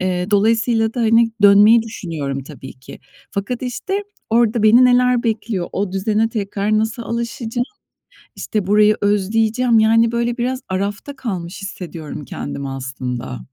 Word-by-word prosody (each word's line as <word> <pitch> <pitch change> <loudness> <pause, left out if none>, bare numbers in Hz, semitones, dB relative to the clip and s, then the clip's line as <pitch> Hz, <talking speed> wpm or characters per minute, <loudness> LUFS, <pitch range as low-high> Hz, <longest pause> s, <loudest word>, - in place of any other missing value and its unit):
eee, 185 +1 -2
dolayısıyla 225 +2 +2
da, 245 - -2
hani, 230 0 +4
dönmeyi 205 +3 +7
düşünüyorum 160 - -5
tabii 135 -2 -11
ki. 130 0 -13 0.3
Fakat, 210 +6 -4
işte, 385 - -3 0.3
orada 230 -1 +2
beni, 235 +4 +6
neler 250 -1 +3
bekliyor, 220 -5 -2
o 195 -1 -2
düzene 215 +3 0
tekrar 210 -1 -1
nasıl 220 +2 -2
alışacağım, 235 +1 -3 0.7
işte, 210 -4 -3
burayı 210 +1 +4
özleyeceğim, 220 +4 +2
yani, 225 +1 +4
böyle, 235 +1 -1
biraz 255 +2 -1
arafta 200 +9 -3
kalmış 195 -7 -5
hissediyorum 170 -6 -7
kendimi 140 +1 -6
aslında. 130 - -5
215 Hz, 135 wpm, -19 LUFS, 190-235 Hz, 0.7 s, dönmeyi